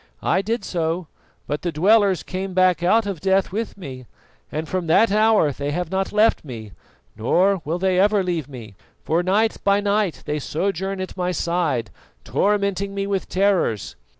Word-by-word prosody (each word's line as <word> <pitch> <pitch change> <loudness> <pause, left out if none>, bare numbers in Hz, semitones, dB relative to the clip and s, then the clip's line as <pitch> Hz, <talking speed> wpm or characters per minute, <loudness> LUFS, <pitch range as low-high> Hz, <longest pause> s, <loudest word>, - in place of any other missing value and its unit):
I 185 - +2
did 225 +4 -2
so, 170 0 -2 0.4
but 145 +1 -3
the 175 - -2
dwellers 195 +3 +3
came 190 0 -5
back 185 -3 +3
out 215 +6 +3
of 195 -5 -4
Death 190 0 +2
with 220 +2 -4
me, 130 - -9 0.4
and 155 +1 -3
from 185 -2 -2
that 195 +7 +4
hour 215 -7 +4
they 140 +1 -4
have 175 +2 -3
not 190 0 -1
left 215 +2 +3
me, 115 -7 -8 0.4
nor 180 - +2
will 160 +4 -1
they 185 0 +1
ever 205 0 +3
leave 170 -6 -2
me; 115 -7 -10 0.3
for 165 +2 +1
night 205 +5 +1
by 200 0 +3
night 205 -3 0
they 150 0 -2
sojourn 190 +5 -2
at 185 - -6
my 180 -1 -1
side, 165 - -1 0.3
tormenting 200 -1 0
me 195 0 -1
with 200 -1 -2
terrors. 185 - 0
185 Hz, 175 wpm, -22 LUFS, 160-200 Hz, 0.4 s, that